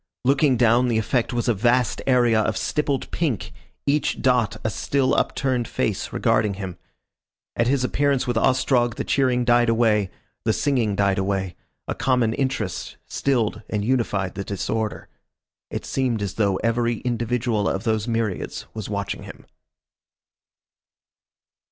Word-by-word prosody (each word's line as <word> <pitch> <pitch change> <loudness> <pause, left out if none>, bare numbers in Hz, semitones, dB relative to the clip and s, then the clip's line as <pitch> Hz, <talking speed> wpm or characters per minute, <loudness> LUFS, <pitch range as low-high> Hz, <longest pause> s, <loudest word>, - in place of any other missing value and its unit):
Looking 135 0 +3
down 120 +1 +4
the 115 -2 +1
effect 115 +3 0
was 120 0 -1
a 120 - +4
vast 120 +3 +1
area 120 -4 +4
of 110 +1 -1
stippled 145 -3 -1
pink, 145 - -2 0.3
each 145 0 +1
dot 125 -5 +2
a 110 - 0
still 135 +2 0
upturned 125 -4 0
face - - -2
regarding 105 -3 +1
him. 95 -3 -6 0.8
At 115 - +1
his 135 0 +2
appearance 140 +1 +1
with 120 - -1
Ostrog 125 0 +2
the - - -3
cheering 125 -3 +1
died 120 -1 +4
away, 110 -4 +2 0.3
the 110 - +2
singing 120 -8 +1
died 100 0 +2
away, 95 -2 -1 0.3
a - - -1
common 125 -4 +1
interest 135 +1 -3
stilled 115 -6 0
and 105 -1 -1
unified 110 -7 0
the 100 - -4
disorder. 105 +2 -3 0.6
It - - -5
seemed 120 -5 -1
as 100 - -3
though 100 -3 +1
every 115 0 0
individual 120 -3 0
of 95 - -2
those 110 -2 0
myriads 115 -4 -2
was 110 -3 -6
watching 100 -1 -3
him. - - -11
120 Hz, 145 wpm, -23 LUFS, 105-125 Hz, 0.8 s, down